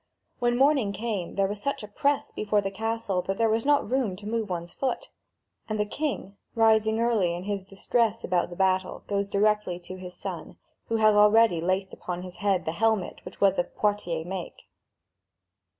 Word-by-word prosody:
When 240 0 +2
morning 270 -6 +3
came, 210 -5 -3
there 195 - +2
was 205 +1 -4
such 280 -3 -2
a - - -6
press 280 +7 0
before 210 0 0
the 195 -1 -2
castle 225 -3 -1
that 195 +2 -3
there 225 -1 +3
was 225 +4 0
not 290 -1 +3
room 250 -7 0
to 205 +3 -12
move 220 -1 -2
one's 175 -1 -4
foot. 260 -2 -3 0.6
And 215 0 -2
the 210 - +2
king, 210 -5 -3 0.2
rising 220 -1 +4
early 220 -7 +2
in 175 - -6
his 200 -1 -3
distress 215 +3 0
about 180 -1 +1
the 175 - -8
battle, 185 0 0
goes 200 0 -1
directly 210 -2 +1
to 185 +2 -8
his 180 -1 -9
son, - - -7 0.3
who 230 - -1
had 215 -1 +5
already 210 -3 +5
laced 185 +2 -1
upon 180 0 -5
his 180 -1 -9
head 195 -1 +1
the 160 - 0
helmet 220 +1 0
which - - -11
was 195 -2 +3
of 175 - -2
Poitiers 180 -6 0
make. 185 -1 -6
205 Hz, 190 wpm, -27 LUFS, 185-225 Hz, 0.6 s, had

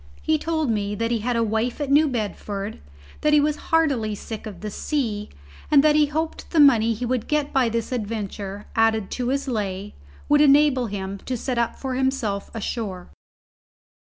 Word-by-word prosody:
He 315 -1 +2
told 315 -5 0
me 205 -1 -1
that 230 +2 -1
he 235 - +1
had 240 +3 -1
a 230 - +2
wife 225 +4 -1
at 285 -2 -2
New 300 +2 +5
Bedford, 210 -4 -4 0.4
that 300 - +3
he 300 - +7
was 300 +1 +1
heartily 275 -10 +2
sick 220 +1 -7
of 195 -5 -9
the 210 0 -5
sea, 220 -6 -2 0.4
and 285 -2 +6
that 305 -1 +5
he 300 -1 +4
hoped 315 +2 -3
the 330 - +1
money 230 -6 +6
he 245 +4 -4
would 245 -2 -1
get 300 -1 0
by 255 -3 +3
this 230 +1 -2
adventure, 205 -3 -4
added 220 -3 +2
to 250 -1 -2
his 275 +1 -1
lay, 205 -4 -3 0.3
would 295 0 +5
enable 280 -3 +5
him 195 -1 -5
to 255 +4 -4
set 245 +1 -2
up 235 - 0
for 265 -1 -4
himself 255 -6 -1
ashore. 205 -4 -4
235 Hz, 190 wpm, -23 LUFS, 210-285 Hz, 0.4 s, he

